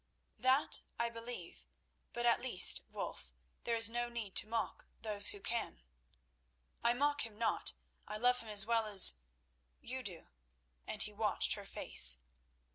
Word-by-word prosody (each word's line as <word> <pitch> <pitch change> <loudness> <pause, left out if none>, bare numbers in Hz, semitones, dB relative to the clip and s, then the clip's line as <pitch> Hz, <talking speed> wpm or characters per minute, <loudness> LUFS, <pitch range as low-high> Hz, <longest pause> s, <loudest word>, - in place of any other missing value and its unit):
"That 260 +3 0 0.2
I 235 0 -2
believe, 230 -6 -10 0.4
but 240 0 -5
at 235 - +1
least, 245 -8 +2
Wulf, - - -8 0.3
there 235 - -2
is 225 -2 +8
no 240 +1 -3
need 230 -5 -8
to - - +2
mock 230 +1 -6 0.2
those 205 -2 +1
who 410 - -3
can." 230 - -5 1.0
"I 235 0 +2
mock 290 +3 -1
him 220 -2 -11
not. 225 -1 -2 0.3
I 210 - -6
love 250 +2 +1
him 225 - -11
as 205 -2 +6
well 230 -1 -1
as—you 60 - +2
do." 185 -8 -8 0.6
And - - 0
he - - -4
watched - - -1
her - - -9
face. 60 -1 +5
225 Hz, 150 wpm, -33 LUFS, 185-240 Hz, 1.0 s, is